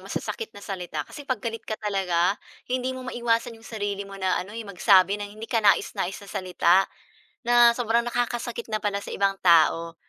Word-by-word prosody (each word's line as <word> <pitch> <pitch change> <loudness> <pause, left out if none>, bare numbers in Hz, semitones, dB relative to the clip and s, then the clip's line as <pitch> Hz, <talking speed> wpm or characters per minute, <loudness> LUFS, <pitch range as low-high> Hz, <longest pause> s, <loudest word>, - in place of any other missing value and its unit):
masasakit 455 - -5
na 200 - -11
salita. 175 -6 -4
Kasi 290 - -10
'pag 255 - -1
galit 230 -1 -4
ka 220 - -3
talaga, 195 -3 +1 0.3
hindi 255 +1 -1
mo 255 - -7
maiwasan 235 0 0
'yong 225 - -16
sarili 205 -2 -3
mo 195 - -9
na 190 -2 0
ano 205 +5 -8
eh, 230 - -5
magsabi 195 0 +4
ng 205 0 -5
hindi 225 +1 -7
kanais-nais 200 -4 +2
na - - -14
salita 180 -1 +1 0.7
na 240 0 +7
sobrang 235 0 +1
nakakasakit 240 -1 -2
na 215 - 0
pala 200 -1 -1
sa - - -8
ibang 195 0 +1
tao. 165 -1 +4
205 Hz, 185 wpm, -25 LUFS, 190-235 Hz, 0.7 s, na